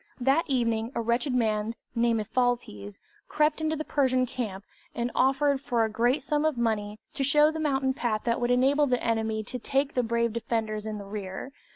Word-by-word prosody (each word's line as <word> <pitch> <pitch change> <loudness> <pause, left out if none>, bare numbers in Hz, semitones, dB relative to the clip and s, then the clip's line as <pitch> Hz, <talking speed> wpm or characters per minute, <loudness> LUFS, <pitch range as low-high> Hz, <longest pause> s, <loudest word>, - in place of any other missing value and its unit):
That 270 +6 +2
evening 230 -4 0
a - - 0
wretched 240 +3 0
man, 220 -1 0 0.2
named 230 -1 +2
Ephialtes, 210 - -2 0.3
crept 305 +1 +1
into 315 0 0
the 310 - -3
Persian 255 -3 +2
camp, 205 -6 -5 0.3
and 240 0 -2
offered, 270 +1 +2
for 235 -4 +1
a 220 - -4
great 240 +5 +1
sum 295 +1 0
of 310 -4 +1
money, 215 -3 -1 0.2
to 275 - -1
show 295 +3 +5
the 320 - -5
mountain 270 -3 +1
path 230 -5 -1
that 235 0 0
would 240 - +1
enable 270 +4 +3
the 250 -2 0
enemy 220 -1 0
to 250 +4 -5
take 270 +4 0
the 250 - +2
brave 235 -1 0
defenders 220 -2 -2
in 215 -1 -4
the 200 - -8
rear! 195 +4 -6
240 Hz, 195 wpm, -27 LUFS, 220-270 Hz, 0.3 s, show